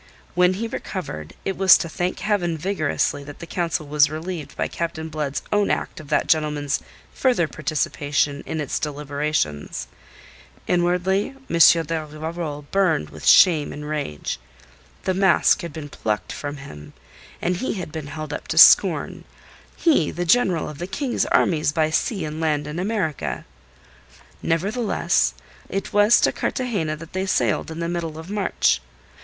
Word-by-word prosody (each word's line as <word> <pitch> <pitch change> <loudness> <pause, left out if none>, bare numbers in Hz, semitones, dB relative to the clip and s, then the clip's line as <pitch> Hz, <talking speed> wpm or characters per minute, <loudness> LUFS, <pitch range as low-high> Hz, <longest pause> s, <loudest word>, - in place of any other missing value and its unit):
When 180 +1 +3
he 230 +4 -3
recovered, 80 - -6
it 195 - -1
was 190 -1 +7
to - - -3
thank 175 +3 -3
Heaven 175 -6 0
vigorously 155 -4 -1
that 145 0 -10
the 170 - -8
council 170 -2 -2
was 145 0 +3
relieved 160 0 -6
by - - 0
Captain 160 -1 -4
Blood's 150 -3 -3
own 205 -1 +2
act - - -2
of 155 - -11
that 150 - +1
gentleman's 150 -2 +1 0.3
further 245 -11 +2
participation 145 -2 -1
in 160 - -3
its 145 -3 -2
deliberations. 145 - -2 0.8
Inwardly 180 +6 +1
M. 165 0 +6
de 160 0 -2
Rivarol 155 0 -5
burned 175 - +1
with - - -7
shame 160 -5 +6
and 150 0 -7
rage. 145 - -3 0.6
The 185 - 0
mask 190 -1 +4
had 170 - -6
been 155 -1 -7
plucked 110 -6 -3
from 145 0 -5
him, 75 - -11 0.5
and 180 +1 0
he 260 - -2
had 180 -5 -5
been 155 -2 -6
held 155 +1 -6
up - - -6
to - - -3
scorn - - +6 0.5
he, 295 - +3
the 175 +1 -3
General 180 -4 +3
of 150 -2 -8
the 175 - -4
King's 250 +6 -1
Armies 155 -3 +2
by 155 0 +1
Sea 185 +2 0
and 155 +1 -5
Land 150 -2 0
in 150 +3 -5
America. 160 - -2 1.0
Nevertheless, 205 +8 +1 0.3
it 195 - -4
was 205 +2 +6
to - - +4
Cartagena 200 -12 -2
that 165 +2 -12
they 190 +1 -2
sailed 120 - +1
in 160 0 -6
the 170 - -2
middle 170 -2 -3
of 160 +4 -8
March. 200 - +1
160 Hz, 160 wpm, -23 LUFS, 150-185 Hz, 1.0 s, was